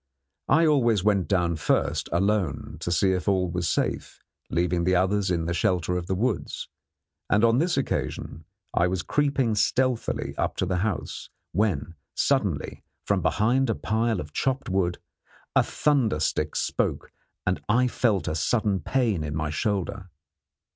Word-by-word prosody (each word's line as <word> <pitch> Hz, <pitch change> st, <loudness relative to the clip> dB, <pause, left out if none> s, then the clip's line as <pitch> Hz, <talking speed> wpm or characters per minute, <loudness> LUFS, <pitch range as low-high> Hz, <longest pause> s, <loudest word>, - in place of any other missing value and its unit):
I 165 Hz, +1 st, +4 dB
always 120 Hz, -, +3 dB
went 100 Hz, -3 st, +2 dB
down 85 Hz, -4 st, +1 dB
first -, -, 0 dB
alone 95 Hz, -3 st, 0 dB
to 85 Hz, -, -3 dB
see 95 Hz, +3 st, +3 dB
if 90 Hz, +1 st, -2 dB
all 95 Hz, -3 st, +2 dB
was 90 Hz, -2 st, -1 dB
safe, -, -, -2 dB, 0.3 s
leaving 85 Hz, 0 st, 0 dB
the 95 Hz, +1 st, +2 dB
others 95 Hz, +2 st, +2 dB
in 85 Hz, -2 st, 0 dB
the 85 Hz, -, -1 dB
shelter 90 Hz, 0 st, +1 dB
of 90 Hz, -1 st, -3 dB
the 95 Hz, -, 0 dB
woods, 110 Hz, 0 st, -2 dB, 0.6 s
and 105 Hz, +2 st, +3 dB
on 115 Hz, +2 st, +4 dB
this 170 Hz, +1 st, +1 dB
occasion 80 Hz, -, -3 dB, 0.3 s
I 85 Hz, -, +3 dB
was 90 Hz, -1 st, -2 dB
creeping 140 Hz, -5 st, +1 dB
stealthily 125 Hz, +3 st, 0 dB
up -, -, 0 dB
to -, -, 0 dB
the 90 Hz, 0 st, -1 dB
house, 100 Hz, 0 st, -3 dB, 0.2 s
when 100 Hz, -3 st, 0 dB, 0.2 s
suddenly, -, -, 0 dB, 0.2 s
from -, -, +1 dB
behind 120 Hz, +4 st, +2 dB
a 115 Hz, -, +1 dB
pile 110 Hz, -1 st, 0 dB
of 75 Hz, -1 st, -7 dB
chopped 135 Hz, -3 st, -1 dB
wood, 90 Hz, -2 st, 0 dB, 0.6 s
a -, -, +7 dB
thunder 135 Hz, -, +1 dB
stick 75 Hz, 0 st, -1 dB
spoke -, -, -1 dB, 0.3 s
and 90 Hz, 0 st, 0 dB
I 125 Hz, +4 st, +4 dB
felt 105 Hz, -, +1 dB
a -, -, 0 dB
sudden 100 Hz, +4 st, +1 dB
pain 110 Hz, -, 0 dB
in 75 Hz, -1 st, -4 dB
my 80 Hz, -1 st, -2 dB
shoulder. 95 Hz, +2 st, -2 dB
95 Hz, 160 wpm, -26 LUFS, 85-115 Hz, 0.6 s, a